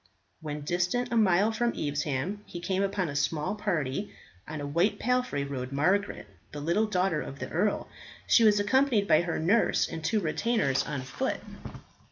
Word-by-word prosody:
When 150 -1 -5
distant 180 +11 -1
a - - 0
mile 205 -1 +4
from 235 +1 0
Evesham, 145 +6 -2
he 175 - -7
came 185 +2 -1
upon 195 -2 0
a 145 - -5
small 150 +3 0
party. 185 -4 -2 0.4
On 155 0 -5
a 145 - -4
white 170 +8 +1
palfrey 250 - 0
rode 130 -2 -5
Margaret, 185 +9 0 0.3
the 150 - -6
little 170 +9 +1
daughter 185 -5 0
of 135 - -7
the - - -6
earl. 200 +6 0 0.4
She 230 - +5
was 210 -2 +5
accompanied 230 -1 +2
by 155 - +5
her 170 -1 -2
nurse 200 +9 +2
and 165 -1 -7
two 220 +4 +1
retainers 180 - +1
on 140 -3 -3
foot. 130 - -3
175 Hz, 175 wpm, -28 LUFS, 150-210 Hz, 0.4 s, She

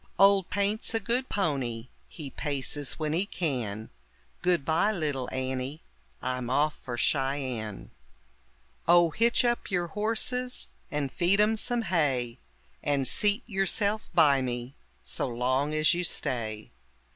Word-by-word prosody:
Old 195 -1 +5
Paint's 205 +3 0
a - - +2
good 240 +5 -1
pony, 130 - -1 0.2
he 145 -5 -8
paces 145 -1 -1
when 155 -1 -2
he 175 +4 +2
can; 120 - -3 0.5
Goodbye, 175 +2 +2
little 145 -9 -2
Annie, 130 +3 -3 0.4
I'm 125 -1 -2
off 145 +3 +2
for 120 -2 -6
Cheyenne. 130 -6 -1 1.0
Oh, 175 -1 +6
hitch 235 +6 +3
up 240 0 0
your 175 -3 -1
horses 230 +6 -1 0.2
and 145 -5 -2
feed 185 +3 +2
'em 215 +1 +4
some 235 +2 0
hay, 135 - 0 0.4
And 140 -2 +1
seat 210 - +4
yourself 205 +1 0
by 145 -6 +5
me 120 0 -4 0.3
so - - -1
long 130 +4 0
as 155 +2 +4
you 175 +1 -1
stay. 115 -10 -2
150 Hz, 130 wpm, -28 LUFS, 130-200 Hz, 1.0 s, Oh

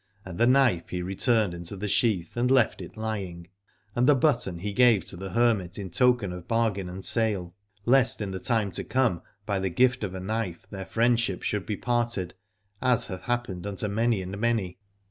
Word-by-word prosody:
And 90 -2 -8
the 120 - +5
knife 125 -9 +3
he 90 -1 -3
returned 100 +1 +1
into 85 +3 -6
the 100 +2 -4
sheath 100 -5 +1
and 120 +1 +1
left 130 -4 +3
it - - -10
lying: 95 -6 -5 0.5
and 125 +1 +2
the 145 - +6
button 120 - +1
he 100 +4 -4
gave 120 -2 +4
to - - -4
the 95 +2 -6
hermit 105 -4 +1
in 95 -3 -6
token 120 -3 +2
of 90 -1 -9
bargain 110 -5 0
and 95 +1 -7
sale, 100 -7 0 0.3
lest 130 -1 +4
in 105 -3 -3
the 95 - -4
time 110 -2 0
to - - -4
come 120 -10 +1 0.2
by 100 -2 -1
the 95 0 -1
gift 125 +6 +2
of 95 -2 -3
a - - -4
knife 95 -3 -3
their 95 -1 -6
friendship 115 -4 +1
should 105 -4 -2
be 105 - -2
parted, 120 -7 -1 0.5
as 125 -2 +3
hath 95 -2 -6
happened 120 -7 -2
unto 100 +1 -3
many 110 -1 +1
and 95 +2 -6
many. 110 -6 -1
105 Hz, 200 wpm, -27 LUFS, 95-120 Hz, 0.5 s, the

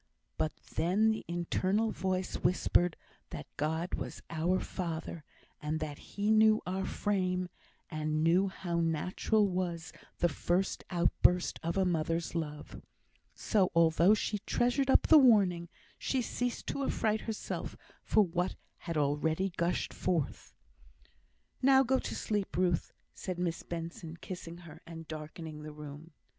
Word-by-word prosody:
But 155 - -1 0.2
then 195 +7 +3
the 220 - -3
internal 185 +5 0
voice 185 -1 -2
whispered 175 -1 +2 0.3
that - - -6
God 160 +4 -1
was - - -4
"Our 170 +3 +1
Father," 165 -3 -4 0.4
and 155 +1 -2
that 150 -2 -5
He 205 +1 -2
knew 220 0 +6
our 190 +1 -2
frame, 185 -3 0 0.4
and 155 -1 -1
knew 175 +4 +4
how 175 -3 -3
natural 180 +6 +1
was 175 -3 -3 0.2
the 175 - +3
first 175 +4 0
outburst 180 0 +2
of 170 +3 -2
a 190 - +3
mother's 165 -1 0
love; 150 -3 -5 0.5
so, 195 -5 +2
although 170 +4 +5
she 210 0 -2
treasured 245 +6 +1
up - - +6
the 315 - +8
warning, 195 -9 +4 0.3
she 265 - 0
ceased 245 +1 -2
to 280 - -2
affright 220 -4 0
herself 220 -2 -4 0.2
for 215 - +4
what 180 0 -1 0.2
had 165 -3 -4
already 155 +6 +1
gushed 170 +1 0
forth. 175 -5 -2 1.1
"Now 265 0 +6
go 265 +1 +2
to - - -4
sleep, 205 -5 -2
Ruth," 180 -2 +1 0.2
said 185 -2 -5
Miss 175 -2 -1
Benson, 165 -1 -6
kissing 170 -1 -7
her, 160 - -12
and 165 -1 -8
darkening 155 0 -7
the 155 0 -7
room. 150 +1 -9
175 Hz, 140 wpm, -32 LUFS, 165-195 Hz, 1.1 s, the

